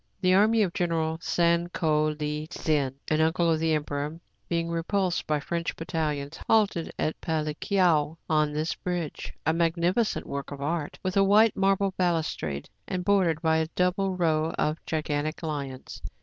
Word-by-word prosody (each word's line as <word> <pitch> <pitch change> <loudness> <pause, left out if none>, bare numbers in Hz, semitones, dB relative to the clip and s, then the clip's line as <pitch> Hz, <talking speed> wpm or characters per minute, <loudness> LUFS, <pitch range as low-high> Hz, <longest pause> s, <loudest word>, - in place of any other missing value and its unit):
The 185 0 +3
army 215 +3 +5
of 180 -3 -2
Gen. 165 -2 0
San 170 0 +2
Ko 155 -3 +1
Li 150 +1 -3
Tzin, 145 -6 0
an 155 0 +2
uncle 165 +1 +2
of 160 - +1
the 160 -1 +2
emperor, 150 +1 -3 0.3
being 170 0 -1
repulsed 180 +2 -1
by 150 -1 +1
French 170 +3 -3
battalions, 155 -2 -3
halted 205 -7 +2
at 155 - -2
Palikao 160 0 +1
on 155 -1 +2
this 155 +2 -1
bridge, 175 -4 -4
— - - -45
a 160 - +3
magnificent 170 +6 +1
work 140 0 -5
of 145 - -7
art,, 150 +1 -2
with 185 +1 -1
a 195 - +6
white 210 +2 +5
marble 195 0 +2
balustrade, 160 - -1 0.2
and 180 -1 -3
bordered 180 -6 +2
by 160 0 +3
a 160 0 0
double 185 +1 +1
row 160 -2 +1
of 155 +2 -1
gigan 150 -2 -1
tic 155 +1 -2
liona. 140 -4 -5
165 Hz, 165 wpm, -27 LUFS, 155-180 Hz, 0.3 s, a